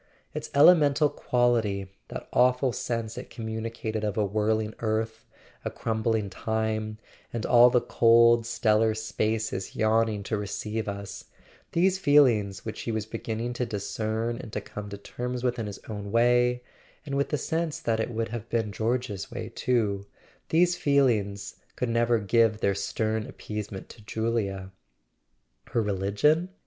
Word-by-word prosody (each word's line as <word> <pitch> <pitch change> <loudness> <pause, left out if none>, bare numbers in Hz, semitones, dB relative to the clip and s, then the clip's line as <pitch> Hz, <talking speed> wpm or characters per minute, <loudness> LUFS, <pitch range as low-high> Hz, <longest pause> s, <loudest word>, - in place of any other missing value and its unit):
Its - - -5
elemental 150 -1 +6
quality, 115 -5 +1 0.2
that - - -7
awful 125 0 +3
sense 115 0 -3
it 125 - -9
com¬ 115 - -7
municated 110 0 -4
of 105 -1 -2
a 105 - +2
whirling 110 +1 0
earth, 110 0 -2 0.4
a - - -2
crumbling 110 -1 -1
Time, 110 +1 -2 0.3
and 115 -2 -3
all 120 0 +7
the 125 0 +3
cold 115 0 +5
stellar 110 -1 +2
spaces 110 -2 -2
yawning 110 -1 +2
to 110 - -2
receive 105 +2 -3
us—these 165 - -3
feelings 120 - +3
which 110 -1 -5
he 115 - -3
was 110 -1 -2
beginning 115 +1 -4
to 125 - -2
discern 110 +1 -2
and 110 - -8
to - - -2
come 105 -1 -8
to 100 - -6
terms 125 +4 -5
with 125 -1 0
in 110 - -2
his 100 - -6
own 105 -2 -5
way 120 +1 +3 0.4
(and 140 - -5
with 140 0 0
the 150 - 0
sense 160 0 -2
that 115 -1 0
it 110 - -1
would 115 -2 -2
have 115 0 -6
been 110 -3 0
George's 110 -3 -2
way 110 - -6
too), 105 -6 0 0.4
these 175 +2 +4
feelings 110 - +1 0.2
could 125 - -2
never 115 0 +3
give 110 +1 +3
their 100 - +2
stern 110 +2 -2
appeasement 105 -3 -6
to 115 - -13
Julia... 105 -3 -2 1.0
Her 115 - +1
religion? 105 - +1
110 Hz, 150 wpm, -27 LUFS, 105-120 Hz, 1.0 s, all